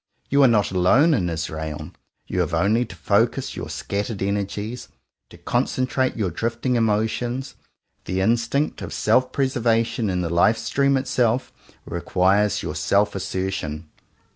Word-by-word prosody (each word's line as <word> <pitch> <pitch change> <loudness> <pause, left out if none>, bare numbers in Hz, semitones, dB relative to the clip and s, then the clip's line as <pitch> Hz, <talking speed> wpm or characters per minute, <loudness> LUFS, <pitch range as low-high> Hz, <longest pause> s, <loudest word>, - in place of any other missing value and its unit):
You 140 +1 +4
are 135 - +7
not 105 -5 +2
alone 120 - +4
in 90 -10 +1
Israel. 80 -2 -5 0.3
You - - -3
have - - 0
only 105 +8 +2
to 100 - -11
focus 115 +9 0
your - - -6
scattered 100 0 -3
energies, 100 +4 -3 0.4
to - - -14
concentrate 130 0 0
your 100 -5 -1
drifting 115 +7 -1
emotions. 115 +4 0 0.5
The 95 - -2
instinct 115 +8 0
of - - -6
self 130 0 +2
preservation 115 -4 +1
in 90 -1 -1
the 85 - -2
Life 90 +6 +4
Stream 140 +2 +1
itself, 125 -2 0 0.3
re 85 - -4
quires 100 +4 +2
your - - -3
self 100 +7 +1
assertion. 95 -5 -4
105 Hz, 140 wpm, -23 LUFS, 95-125 Hz, 0.5 s, are